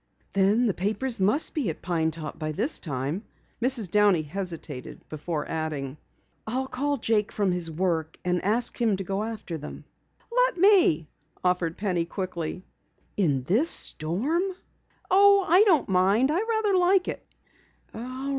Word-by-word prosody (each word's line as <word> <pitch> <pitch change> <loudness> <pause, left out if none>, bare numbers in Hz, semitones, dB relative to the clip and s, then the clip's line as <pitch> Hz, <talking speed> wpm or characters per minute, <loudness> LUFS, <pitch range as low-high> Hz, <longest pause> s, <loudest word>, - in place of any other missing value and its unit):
"Then 200 +5 +3
the 210 - +1
papers 220 +7 -2
must 210 +11 +2
be 280 - -1
at 160 - -7
Pine 165 -3 0
Top 160 -1 -7
by 155 -1 -3
this 235 - +1
time." 145 - -4 0.4
Mrs. 235 -7 +3
Downey 205 -6 +4
hesitated 165 -5 -6
before 155 0 -4
adding: 150 -4 -4 0.5
"I'll 255 +4 -1
call 285 +2 -2
Jake 220 -3 0
from 200 -3 0
his 175 -2 +1
work 160 -1 -2
and 180 -1 0
ask 230 +5 +1
him 220 -4 +2
to 195 - -4
go 195 +2 -3
after 215 -7 -5
them." 150 - -9 0.5
"Let - - +2
me," 350 - +4 0.4
offered 180 -2 0
Penny 180 -4 -1
quickly. 180 -1 -5 0.5
"In 145 -10 +1
this 230 - +2
storm?" 215 - +1 0.7
"Oh, 400 0 +6
I 355 +4 +6
don't 335 -9 +3
mind. 195 +8 +3
I 355 - +1
rather 440 -3 +1
like 365 +1 +3
it." - - -5
195 Hz, 145 wpm, -26 LUFS, 165-260 Hz, 0.7 s, Oh